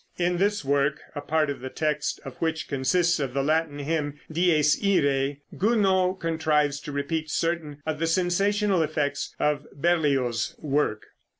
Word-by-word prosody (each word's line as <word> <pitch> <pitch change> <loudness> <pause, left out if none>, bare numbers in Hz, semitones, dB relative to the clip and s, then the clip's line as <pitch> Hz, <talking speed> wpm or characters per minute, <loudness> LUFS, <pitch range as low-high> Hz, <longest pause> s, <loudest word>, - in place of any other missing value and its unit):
In 175 0 +1
this 200 -3 0
work, 140 +1 +1
a 145 - -5
part 155 0 +1
of 140 - -6
the 130 - -6
text 150 +1 -1
of 135 - -7
which 160 -1 -2
consists 170 +5 +1
of 135 -3 -3
the 135 - +1
Latin 155 0 +1
hymn 145 0 -2
"Dies 155 -3 +3
Iræ," 140 -7 +1
Gounod 190 -3 +2
contrives 150 -3 +1
to 150 - -7
repeat 155 +3 -2
certain 155 -3 -2
of 155 -1 -2
the 165 - 0
sensational 190 +3 +2
effects 145 -2 -2
of 150 -1 0
Berlioz's 140 -7 +1
work. 140 -7 -1
155 Hz, 155 wpm, -26 LUFS, 145-175 Hz, -, Dies